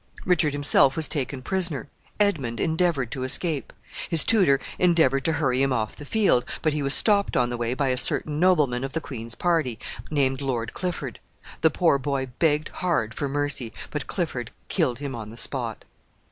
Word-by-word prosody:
Richard 165 -5 +2
himself 145 -1 +4
was 160 -2 +2
taken 135 -3 -3
prisoner. 170 - +1 0.3
Edmund 140 - 0
endeavored 160 -7 0
to 135 - -5
escape. 140 +3 0 0.4
His 165 -2 +4
tutor 185 -12 +3 0.2
endeavored 160 -7 +3
to 165 - +2
hurry 135 -4 0
him 135 0 +1
off 110 -4 -2
the 145 - -11
field, 200 - +2 0.2
but 155 - +2
he 150 - -2
was 140 0 +4
stopped 205 -2 +3
on 120 -1 +1
the - - -2
way 120 +1 -2
by 140 -1 0
a 130 - 0
certain 150 +3 +3
nobleman 150 -9 +2
of 135 0 -5
the 165 - -1
queen's 115 -6 -6
party, 160 -10 0 0.3
named 135 -3 0
Lord 120 -4 -3
Clifford. 180 -1 -4 0.4
The 160 - +5
poor 155 -2 +2
boy 135 -1 -2
begged 155 -1 +1
hard 165 -11 -1
for 140 +2 -3
mercy, 140 -4 -2 0.2
but - - -4
Clifford - - -3 0.2
killed 120 -2 0
him 140 0 -5
on 110 -3 -7
the 115 - -11
spot. 120 -4 -2
140 Hz, 185 wpm, -24 LUFS, 130-160 Hz, 0.4 s, The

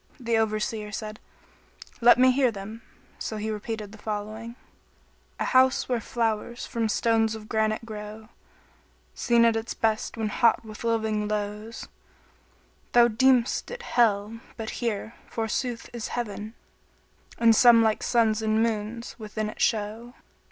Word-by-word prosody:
The 235 -2 0
Overseer 215 -1 -1
said, 215 0 -6 0.8
"Let 240 +1 +7
me 255 +1 +6
hear 260 -1 +3
them," 215 +1 -8 0.4
so 220 - -4
he 215 +1 -3
repeated 215 -1 -5
the 220 - -13
following, 215 +2 -5 0.8
"A - - 0
house 260 0 +3
where 245 -3 0
flowers 230 0 -2
from 230 -4 -2
stones 225 0 +2
of 215 -1 -10
granite 220 +1 0
grow, 215 0 -8 0.4
* - - -34 0.3
Seen 235 -1 +3
at 230 -1 +4
its 225 +1 -3
best 220 +1 -1
when 220 -1 -1
hot 230 +1 +2
with 215 0 -9
living 220 -2 0
lows: 210 +2 -4 1.1
Thou 240 0 +6
deem'st 250 +2 +2
it 485 0 -7
Hell 220 -1 +1 0.2
but 220 -1 -4
here, 225 -1 -2 0.2
forsooth, 230 +2 -3
is 235 -2 -4
Heaven, 215 -1 -5 0.4
* - - -26
And 230 -1 +5
some 235 0 +7
like 220 -1 +1
suns 225 -2 +2
and 220 0 +2
moons 230 +1 -3
within 215 0 -4
it - - -10
show." 225 +3 -1
225 Hz, 145 wpm, -26 LUFS, 215-235 Hz, 1.1 s, Let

